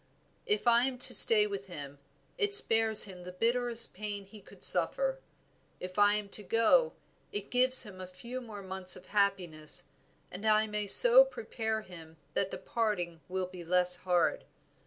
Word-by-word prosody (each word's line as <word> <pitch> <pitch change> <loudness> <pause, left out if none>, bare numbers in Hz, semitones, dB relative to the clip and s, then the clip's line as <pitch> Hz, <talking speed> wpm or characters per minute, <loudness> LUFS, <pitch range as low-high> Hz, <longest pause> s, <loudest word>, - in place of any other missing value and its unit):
If 425 - -3
I 240 +1 +2
am 265 -1 -6
to 255 - +3
stay 215 -2 +7
with 200 -1 -8
him, 145 -5 -11 0.4
it 415 -4 0
spares 225 - +3
him 185 -3 -10
the 180 +1 -11
bitterest 235 +4 +1
pain 205 0 -9
he 205 +2 -17
could - - -16
suffer; - - +1 0.6
if 185 +2 -8
I 205 0 +3
am 210 -1 -6
to 210 - -4
go, 230 - 0 0.4
it 415 - -9
gives 255 +1 +5
him 195 -4 -12
a 185 - -10
few 235 +8 -11
more 215 -4 -12
months 190 -1 -4
of - - -16
happiness, 185 -7 -1 0.5
and 185 +3 -11
I 215 0 +1
may 210 -1 -6
so - - +8
prepare 225 - -6
him 165 -5 -16 0.2
that 195 - -3
the - - -9
parting 180 -8 -5
will 185 0 -5
be 180 -1 -13
less 180 +1 +1
hard. 180 -1 -2
210 Hz, 175 wpm, -28 LUFS, 185-235 Hz, 0.6 s, so